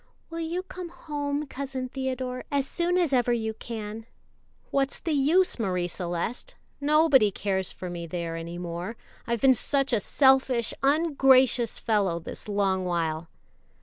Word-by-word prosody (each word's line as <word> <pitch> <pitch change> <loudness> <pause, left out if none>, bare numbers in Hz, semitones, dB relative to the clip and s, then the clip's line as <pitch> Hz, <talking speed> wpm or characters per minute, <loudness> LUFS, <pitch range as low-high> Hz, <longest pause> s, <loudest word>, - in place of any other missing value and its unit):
"Will 330 - -4
you 335 +3 -2
come 365 -2 -8
home, 290 -3 -3
Cousin 265 -2 -5
Theodore, 255 -1 -3
as 280 -2 0
soon 350 +4 0
as 340 -6 +1
ever 245 -1 +3
you 220 -2 -1
can?" 220 0 -7 0.6
"What's 275 0 +1
the 330 - -3
use, 305 +4 +3
Marie 180 -5 0
Celeste? 175 - -4 0.2
Nobody 290 -5 +5
cares 190 -1 -2
for 185 - -7
me 170 -1 -5
there 170 0 -4
any 165 +1 -6
more, 175 +5 -5 0.3
I've 235 -1 -1
been 270 -1 +7
such 275 +2 +1
a 230 - +4
selfish, 265 0 +3
ungracious 270 -5 +4
fellow 200 -6 +1
this 170 - -6
long 195 -2 +1
while." 165 -2 -1
250 Hz, 150 wpm, -27 LUFS, 190-285 Hz, 0.6 s, been